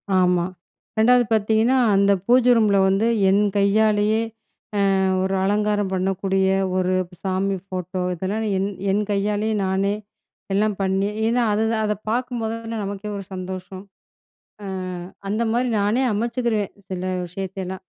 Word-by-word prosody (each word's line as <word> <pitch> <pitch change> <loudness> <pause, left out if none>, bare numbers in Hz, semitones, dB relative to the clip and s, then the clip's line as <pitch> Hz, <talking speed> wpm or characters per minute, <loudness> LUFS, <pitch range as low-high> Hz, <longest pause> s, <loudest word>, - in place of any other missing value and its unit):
ஆமா. 180 -1 +3 0.5
2ஆவது 245 +2 +5
பாத்தீங்கன்னா, 220 +4 +3 0.2
அந்த 200 +1 +4
பூஜை 250 +1 +5
ரூமில 210 -3 +3
வந்து, 195 +4 +2 0.2
என் 200 +2 +4 0.2
கையாலயே 210 +1 +3 0.8
அ - - +2 0.2
ஒரு 190 +1 0
அலங்காரம் 205 0 +1
பண்ணக்கூடிய 190 +1 0 0.3
ஒரு 185 0 +1 0.3
சாமி 195 +1 0
ஃபோட்டோ 185 -1 -4
இதெல்லாம் 195 +6 -2
என் 195 +1 0 0.2
என் 205 +2 +1
கையாலயே 210 +2 0
நானே 195 +2 +1 0.6
எல்லாம் 210 0 +1
பண்ணி 195 +1 +1 0.2
ஏன்னா, 240 +2 +2
அதுதான் 220 +1 +1
அத 210 - +1 0.2
பாக்கும்போது 240 -2 -2
தான 225 0 -4
நமக்கே 200 +1 -5
ஒரு 200 - -6
சந்தோஷம். 185 +1 -7 0.8
அ - - -6 0.6
அந்த 215 +3 0
மாதிரி 245 +2 +1
நானே 210 +6 +1
அமைச்சுக்குருவேன், 230 -2 -1
சில 185 -1 -4 0.2
விஷயத்தையெல்லாம். 190 +1 -6
200 Hz, 125 wpm, -22 LUFS, 190-220 Hz, 0.8 s, 2ஆவது